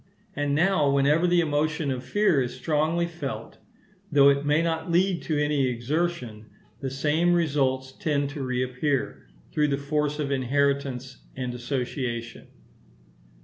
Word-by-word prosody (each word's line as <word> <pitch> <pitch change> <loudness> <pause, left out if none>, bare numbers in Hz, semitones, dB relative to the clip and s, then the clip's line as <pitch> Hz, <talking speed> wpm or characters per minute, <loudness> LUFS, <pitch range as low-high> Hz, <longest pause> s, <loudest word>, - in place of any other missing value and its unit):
And 145 0 0
now, 160 -3 +3
whenever 145 +5 +3
the 175 0 +4
emotion 150 -1 0
of 130 -1 -3
fear 205 -9 +2
is 125 -1 -3
strongly 160 +2 0
felt, 160 -5 -6 0.5
though 140 -1 +7
it 140 0 +2
may 150 +3 +3
not 160 0 -2
lead 180 +1 +2
to 155 - 0
any 145 -2 +1
exertion, 125 -3 -2 0.3
the 135 - -3
same 155 +6 +1
results 135 -5 0
tend 145 -4 -1
to 145 -1 -6
reappear, 130 +2 -2 0.2
through 150 -1 +2
the 140 -1 0
force 150 +1 -1
of 145 -2 -2
inheritance 135 -1 0 0.2
and 125 -2 -3
association. 125 -1 -4
145 Hz, 140 wpm, -26 LUFS, 130-155 Hz, 0.5 s, though